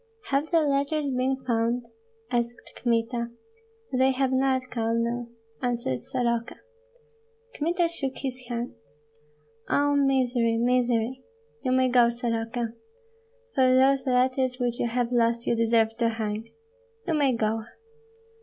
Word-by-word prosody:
"Have 280 +3 +1
the 335 -2 +4
letters 285 0 0
been 260 +1 0
found?" 235 0 0 0.5
asked 240 0 0 0.2
Kmita. 235 0 0 0.6
"They 260 +1 +4
have 260 0 +1
not, 260 -1 +1
Colonel," 235 +1 -1 0.3
answered 235 - -1
Soroka. 235 -2 -1 1.0
Kmita 340 -1 +1
shook 275 -6 -4
his 255 -2 -5
hands. 240 0 -3 1.0
"Oh, 285 0 +3
misery, 255 -4 +2
misery! 245 +1 +1 0.4
You 255 - -1
may 260 0 +4
go, 245 -1 +5
Soroka. 230 -1 -2 0.8
For 255 -2 +4
those 270 +1 +4
letters 255 0 +2
which 240 -1 -1
you - - +1
have 240 0 -1
lost 235 -1 +2
you - - +2
deserve 225 -1 +2
to 235 -1 +2
hang. 220 0 -4 0.5
You 340 - 0
may 285 -4 +3
go. 225 -1 0
245 Hz, 125 wpm, -26 LUFS, 235-265 Hz, 1.0 s, go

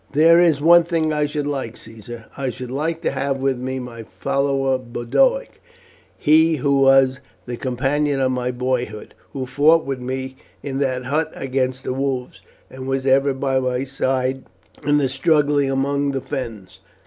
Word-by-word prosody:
"There 165 +3 +6
is 165 -5 +3
one 170 +2 +7
thing 165 -2 -1
I 150 -1 +1
should 150 0 -3
like, 135 -5 -4
Caesar; 115 +1 -10
I 135 -1 -2
should 125 +1 -7
like 160 +5 -2
to - - +1
have 135 0 -1
with 135 -1 0
me 130 +1 -3
my 125 -2 -7
follower 135 +2 -1
Boduoc, 130 - 0 0.6
he 160 +2 +4
who 140 0 +1
was 135 0 +5 0.3
the 120 - -5
companion 135 +3 -1
of 130 -1 +1
my 125 -1 -2
boyhood, 125 -3 -3 0.2
who 130 -2 -3
fought 150 +5 +3
with 135 -1 -3
me 130 +1 -5 0.3
in 135 -1 -3
that 130 -2 -1
hut 150 +4 -1
against 130 -1 -2
the - - -2
wolves, 130 -2 -3 0.3
and 130 0 -9
was 135 0 -1
ever 135 +1 +3
by 135 0 0
my 125 0 -1
side 130 -1 -1 0.4
in 145 +1 +3
the 140 -2 +2
struggle 145 +2 +2
among 140 +1 0
our - - 0
fens. 110 -8 -6
135 Hz, 170 wpm, -21 LUFS, 130-145 Hz, 0.6 s, one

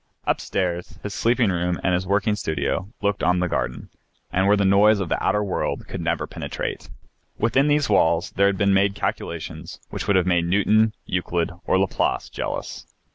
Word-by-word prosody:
Upstairs 90 -2 -2
his 105 - -4
sleeping 115 -3 +2
room 90 0 -1
and 95 - +2
his 90 +1 -1
working 105 +2 +1
studio, 95 +1 -2
looking 100 -2 0
on 90 0 +3
the 90 0 +1
garden, 60 -6 -3 0.4
and 95 +1 +2
where 105 +1 +5
the 100 - +2
noise 100 +2 +5
of 95 -4 -3
the - - -1
outer 105 - +2
world 100 - -2
could - - -5
never - - -1
penetrate. - - -5 0.5
Within 130 +6 +2
these 145 -1 +2
walls 85 -4 +2
there 100 0 +3
had 100 -1 0
been 100 +1 +3
made 100 +1 +3
calculations - - -5
which - - -5
would 100 - +3
have 90 -2 +3
made 90 -2 +2
Newton, 105 +4 +3
Euclid, 90 -1 -1 0.2
or - - +3
Laplace 95 0 0
jealous. - - -5
95 Hz, 185 wpm, -23 LUFS, 90-105 Hz, 0.5 s, where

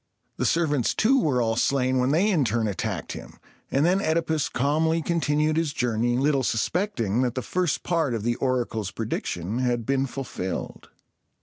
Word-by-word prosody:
The - - +1
servants 150 -7 +1
too 265 +5 +4
were 130 - +1
all 115 0 0
slain 130 +1 +1
when 125 +1 +2
they 180 +9 +3
in 165 -7 +3
turn 115 -1 0
attacked 100 - -3
him; - - -9 0.3
and 140 +3 +2
then 185 +3 +3
OEdipus 160 -3 0
calmly 160 +5 +1
continued 155 -2 +1
his 160 -3 0
journey, 120 -2 0
little 140 +1 +2
suspecting 120 - 0
that 125 -2 0
the 130 - -2
first 180 +5 -1
part 165 -8 0
of 110 - -4
the 120 +1 +1
oracle's 120 -6 -1
prediction 105 -1 -3
had 120 -2 0
been 135 +1 +1
fulfilled. 125 -8 -5
135 Hz, 170 wpm, -25 LUFS, 120-160 Hz, 0.3 s, too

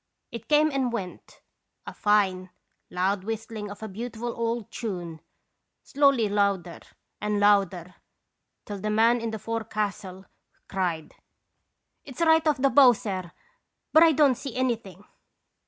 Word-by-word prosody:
It 230 -1 -8
came 305 +1 +3
and 265 -3 -1
went, 195 -6 -7 0.4
a - - -8
fine, 190 -3 +1 0.4
loud 185 +2 -1
whistling 220 -1 -5
of 205 +2 -10
a - - -4
beautiful 230 +3 -6
old 230 -1 -3
tune, 175 -8 -6 0.6
slowly 275 -5 +2
louder 200 -4 -1 0.4
and 210 0 -1
louder, 195 -4 +2 0.7
till 205 -1 -6
the 215 +2 -3
man 225 +3 +3
in 230 - -3
the 220 - -4
forecastle 210 -4 -4 0.4
cried: 175 -5 -3 0.3
" - - -52
' - - -53
It's 265 -3 -11
right 320 -1 +4
off 300 -2 +2
the 270 +1 +2
bow, 255 -1 +7
sir; 190 -5 -5 0.6
but 315 - +7
I 330 -1 +7
don't 290 -3 +4
see 250 0 -8
anything.' 230 -7 -3
215 Hz, 140 wpm, -26 LUFS, 195-245 Hz, 0.7 s, bow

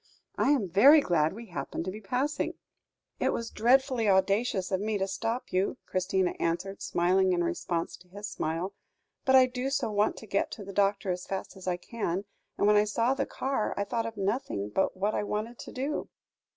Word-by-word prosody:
"I - - +2
am 265 -9 +3
very 260 - +7
glad 165 - +2
we 230 +3 -9
happened 170 - -5
to 185 - -2
be 215 +3 -8
passing." 255 +9 -1 0.6
"It - - +2
was 230 0 -3
dreadfully 250 -1 +3
audacious 195 +1 +2
of 190 0 +1
me 215 0 0
to 195 0 -1
stop 225 +5 -3
you," 185 +2 +1
Christina 185 0 0
answered, 180 +4 -2
smiling 185 +2 +2
in 175 -1 +1
response 170 0 -2
to 180 - -20
his 205 +3 -7
smile, 165 +4 -3 0.5
"but 265 -1 +5
I 260 -1 +8
do 255 +1 -3
so 275 -5 0
want 210 +1 +1
to - - -9
get 200 -1 0
to 205 - -7
the 195 - -8
doctor 200 -1 +1
as 180 0 -4
fast 195 -1 -4
as 190 -1 -11
I 180 -1 +1
can, 195 -1 -3 0.3
and - - +2
when 210 0 +5
I 210 - +6
saw 230 +4 +1
the 275 0 -2
car, 265 -5 -2
I 200 - +1
thought 230 +3 -2
of 225 - -7
nothing 195 - -1
but 190 - 0
what 205 +3 0
I - - 0
wanted 215 +3 -3
to - - -8
do." 275 +4 -3
205 Hz, 205 wpm, -29 LUFS, 185-235 Hz, 0.6 s, I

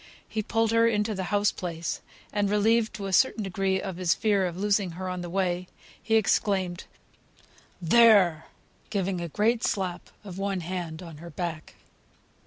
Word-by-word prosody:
He 220 - -2
pulled 225 +1 0
her 230 0 +4
into 215 -1 +1
the 190 -2 -3
house 205 +2 +2
place; 170 -2 -4 0.3
and 205 -1 +1
relieved 220 +2 +2
to 200 -2 -5
a 195 - -3
certain 230 0 +3
degree 190 0 0
of 190 -2 -5
his 180 -2 +2
fear 200 -4 +2
of 175 0 -6
losing 200 -2 +1
her 185 +2 -5
on 180 -1 -3
the 175 - -6
way, 180 -1 -1 0.3
he 225 - +1
exclaimed, 195 -4 +1 0.9
"There!" 190 -4 +5 0.4
giving 195 -3 -1
a 170 - -3
great 225 +7 +1
slap 185 -3 -2
of 190 -2 -8
one 195 -2 -1
hand 170 -1 -5
on 165 -3 -10
her 170 +3 -10
back. 170 -1 -5
190 Hz, 170 wpm, -27 LUFS, 175-210 Hz, 0.9 s, There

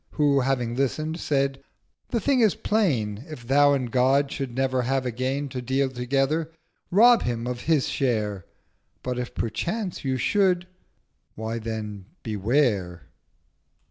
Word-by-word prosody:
Who, 145 -2 +3
having 125 -3 0
listen'd, 155 +5 -1
said—'The 140 - -3
Thing 270 +3 +2
is 220 -5 +4
plain: 135 - 0
1020 135 +8 -12
If 120 -5 -10
Thou 145 +2 +5
and 130 -4 -1
God 135 +3 +3
should 135 -4 -4
never 130 -1 +1
have 130 +1 0
again 130 +4 -2
To 130 -1 -5
deal 130 +2 0
together, 135 +6 0 0.4
rob 230 +5 +6
him 120 -1 -2
of 125 0 -3
his 155 -4 +2
share: 105 -8 -1 0.6
But 125 -1 -2
if 125 - -5
perchance 180 - -3
you 130 -1 0
should—why 180 - -2
then 105 -3 -5 0.2
Beware!' 105 - 0
135 Hz, 135 wpm, -25 LUFS, 120-150 Hz, 0.6 s, rob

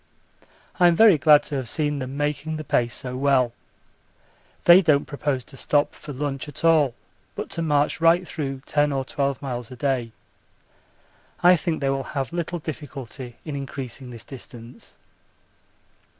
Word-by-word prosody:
I'm 175 -1 +6
very 205 -5 +6
glad 150 +1 +6
to 145 - -4
have 130 -3 -4
seen 150 -2 -1
them 130 +1 -5
making 150 +2 -2
the 155 - -5
pace 120 -5 0
so 125 -2 -4
well. 130 -3 +2 1.1
They 175 +2 +9
don't 150 -5 +3
propose 145 -3 -2
to 135 - -14
stop 145 +2 +1
for 150 - -10
lunch 140 +1 -4
at 150 - -6
all 155 -7 +4 0.4
but - - -5
to 165 - -3
march 150 -1 +1
right 170 +2 +4
through 135 -4 -5
10 145 -1 +1
or 135 -1 -1
12 140 0 -2
miles 125 -3 -4
a 130 - -9
day. 125 -3 -1 1.3
I 180 +1 +8
think 165 -2 -2
they 135 - +1
will 135 0 -1 0.2
have 135 +4 -2
little 175 0 -2
difficulty 135 -5 -7
in 150 -3 -5
increasing 135 -2 -6
this 120 -2 -9
distance. 125 -2 -12
140 Hz, 160 wpm, -24 LUFS, 130-155 Hz, 1.3 s, They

